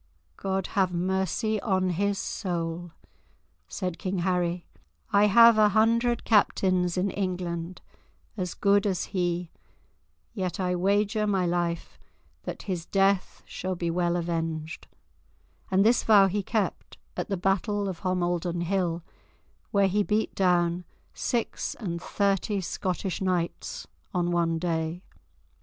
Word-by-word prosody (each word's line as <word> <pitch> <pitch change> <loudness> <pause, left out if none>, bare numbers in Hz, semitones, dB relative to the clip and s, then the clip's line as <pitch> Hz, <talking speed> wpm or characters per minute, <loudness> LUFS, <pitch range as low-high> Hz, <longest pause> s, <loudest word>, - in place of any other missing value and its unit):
"God 190 - -2
have 190 -3 +2
mercy 190 +4 0
on 185 -4 +1
his 200 +3 0
soul," 175 -4 -3 0.8
said 180 - -4
King 190 -1 -2
Harry; 180 -1 0 0.5
"I 200 +1 +6
have 230 +2 +7
a 210 -1 +6
hundred 230 +3 +2
captains 185 -4 +2
in 190 +2 +1
England 180 -2 -3 0.5
as 180 -4 -3
good 200 0 +3
as 190 -2 0
he, 175 -2 -1 0.8
yet 185 -1 -3
I 180 -1 0
wager 205 +3 +1
my 190 -3 +1
life 170 - -2 0.5
that - - -5
his 180 -4 -4
death 195 -1 +1
shall 185 0 -4
be 170 -1 -2
well 175 0 +1
avenged"; 165 -2 -3 0.8
and 195 +1 +3
this 235 +2 +4
vow 205 -3 +6
he 200 +2 0
kept, 210 +1 -2 0.2
at - - -3
the 195 - -1
Battle 200 +2 0
of 185 -3 -4
Homildon 175 -1 -1
Hill, 175 -2 -1 0.7
where 200 -1 +3
he 205 +2 +1
beat 210 +2 0
down 175 -2 +2 0.3
six 235 -2 -2
and 170 -6 -4
thirty 200 +1 0
Scottish 185 +1 -3
knights 180 -3 -2 0.3
on 175 -1 +1
one 170 -1 +1
day. 165 +1 -2
185 Hz, 130 wpm, -27 LUFS, 175-200 Hz, 0.8 s, have